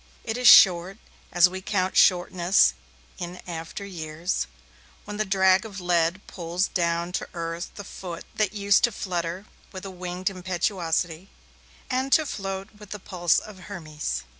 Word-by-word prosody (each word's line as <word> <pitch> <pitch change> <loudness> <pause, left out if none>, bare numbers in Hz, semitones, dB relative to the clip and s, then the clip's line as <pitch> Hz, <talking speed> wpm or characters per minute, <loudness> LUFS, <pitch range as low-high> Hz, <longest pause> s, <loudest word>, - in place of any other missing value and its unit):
It 225 - -3
is 250 -1 +2
short, 185 0 +7 0.3
as 175 0 +6
we 185 +1 -7
count 190 -1 -1
shortness 180 0 +4 0.5
in 175 +1 -6
after 165 +3 -6
years, 160 - -3 0.6
when 205 0 -6
the 215 - 0
drag 190 0 +4
of 205 -3 -8
lead 175 +1 +1
pulls 175 +1 -2
down 170 -1 0
to - - -3
earth 165 +1 -4
the 205 - -7
foot 180 -3 -8
that 210 -3 0
used 200 -1 +2
to 240 - -2
flutter 180 -1 -4 0.3
with 190 0 -8
a 195 - -6
winged 180 +1 -3
impetuosity, 180 -1 -2 0.6
and 260 +1 -1
to 315 - +5
float 195 -4 -5
with 210 -2 -12
the 210 - -5
pulse 175 -3 +1
of 210 -3 -5
Hermes. 155 - -4
185 Hz, 155 wpm, -25 LUFS, 170-195 Hz, 0.6 s, short